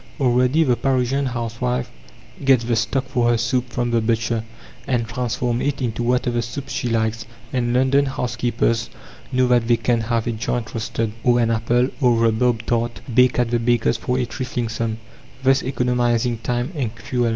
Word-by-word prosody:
Already 125 +4 +3
the 125 -5 +2
Parisian 130 +2 0
housewife 120 +1 -2 0.5
gets 135 -3 +4
the 115 0 0
stock 130 +3 0
for 125 -2 +1
her 120 - +3
soup 125 +2 0
from 120 0 -2
the 115 -1 +2
butcher, 115 0 0 0.4
and 120 -4 +1
transforms 120 0 -1
it 140 -1 -1
into 120 -3 -2
whatever 120 0 +1
soup 135 +4 -6
she 125 -2 -2
likes, 110 -1 -1 0.3
and 120 -2 0
London 130 +3 +3
housekeepers 120 -3 -1 0.4
know 130 0 +3
that 120 -2 +2
they 120 -1 +4
can 115 +1 +1
have 115 0 -1
a 120 - 0
joint 115 0 -3
roasted, 110 0 -2
or 120 -1 +4
an 115 -1 +2
apple 120 +3 +1
or 125 -2 +5
rhubarb 115 0 +2
tart 120 0 -1
baked 125 +1 +4
at 120 -1 +1
the 120 - +2
baker's 115 -1 +2
for 125 +2 -1
a 125 - +1
trifling 120 -1 -3
sum, 110 0 -2 0.5
thus 135 0 +4
economizing 120 -2 0
time 120 +4 -2
and 125 -7 -2
fuel. 120 0 -1
120 Hz, 175 wpm, -21 LUFS, 115-125 Hz, 0.5 s, or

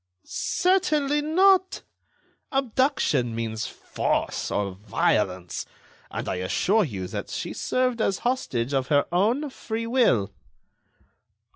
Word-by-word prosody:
"Certainly 305 -6 +1
not. 375 +4 +3 0.7
Abduction 255 - +1
means 115 0 -3
force - - -2
or 100 -1 -1
violence. 95 -2 -1 0.4
And - - -5
I - - -1
assure 190 - +2
you 100 - -4
that - - -5
she - - -4
served 250 -2 0
as 195 -3 +1
hostage 140 - -1
of 135 -1 +1
her 145 0 +3
own 235 - +1
free 230 -2 -4
will." 225 - +2
210 Hz, 110 wpm, -25 LUFS, -, 0.7 s, not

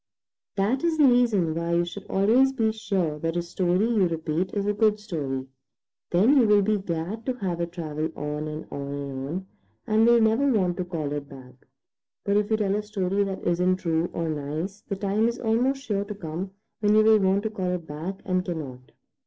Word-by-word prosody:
That 215 +8 +1
is 335 -2 +1
the 300 - +6
reason 235 -10 +3
why 170 +1 -2
you 175 0 +2
should 190 +3 -8
always 235 +8 +4
be 225 -4 +1
sure 195 -8 -2
that 165 +2 -2
a 175 - 0
story 180 +4 +1
you 215 -6 +3
repeat 165 +2 -2
is 200 -1 -2
a 205 - +1
good 210 0 +2
story. 145 -11 -4 0.6
Then 215 +12 +4
you 240 -4 +5
will 205 -1 +5
be 210 +1 +1
glad 185 +4 -4
to 255 - +1
have 180 -6 -2
it 170 0 -3
travel 155 -2 -3
on 150 +1 -4
and 155 +1 -6
on 140 0 -5
and 135 -1 -5
on, 185 +4 -4 0.4
and 220 +1 +3
will 235 0 +6
never 230 +5 +3
want 185 -6 +1
to 180 - -2
call 155 -5 -3
it 145 -1 -5
back. 130 -2 -12 0.7
But 200 - +1
if 210 +1 +2
you 220 - +2
tell 200 -2 0
a 210 - 0
story 200 -2 -1
that 190 -1 -5
isn't 180 +1 +2
true 165 -2 0
or 165 - -2
nice, 155 +6 -4
the 200 - -2
time 200 +3 +1
is 235 0 -2
almost 250 +4 0
sure 205 -5 -1
to 205 0 -7
come 175 0 -5 0.3
when 210 0 +3
you 215 - +6
will 220 0 +6
want 195 +1 +2
to 220 - -2
call 185 -4 -2
it 180 -2 -3
back 160 +6 -6
and 185 -1 0
cannot. 140 -8 -6
190 Hz, 215 wpm, -26 LUFS, 165-215 Hz, 0.7 s, the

